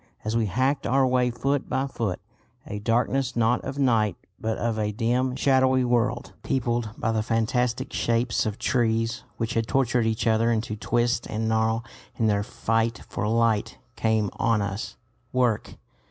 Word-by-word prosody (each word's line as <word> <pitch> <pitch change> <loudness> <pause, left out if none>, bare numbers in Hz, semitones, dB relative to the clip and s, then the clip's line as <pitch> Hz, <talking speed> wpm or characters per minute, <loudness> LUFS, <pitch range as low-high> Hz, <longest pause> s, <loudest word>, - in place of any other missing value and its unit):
As 110 +1 -1
we 115 -2 +2
hacked 130 +4 0
our 135 +4 +3
way 125 -1 +2
foot 135 +4 -1
by 130 +1 0
foot, 115 -8 -3 0.5
a 105 - -5
darkness 125 +4 0
not 120 +1 +2
of 135 +1 -5
night 115 -8 +2 0.2
but 110 0 -2
of 115 -2 -1
a 105 -1 0
dim, 125 +4 0
shadowy 130 -1 +3
world, 120 0 0
peopled 120 -3 -1
by 115 - 0
the 110 -1 +1
fantastic 120 +3 0
shapes 115 -1 +1
of 105 0 -3
trees, 115 -2 0
which 115 0 -2
had 115 -1 0
tortured 125 -3 +2
each 110 0 -1
other 115 +1 +3
into 110 -1 -1
twist 120 +2 0
and 110 +1 -2
gnarl 110 +1 +1 0.3
in 115 - 0
their 105 -2 +2
fight 115 +2 -1
for 105 - -2
light, 115 -1 +1 0.2
came 110 -3 +1
on 115 -2 +2
us. 100 +3 -4 0.3
Work! 125 -4 0
115 Hz, 165 wpm, -25 LUFS, 110-125 Hz, 0.5 s, our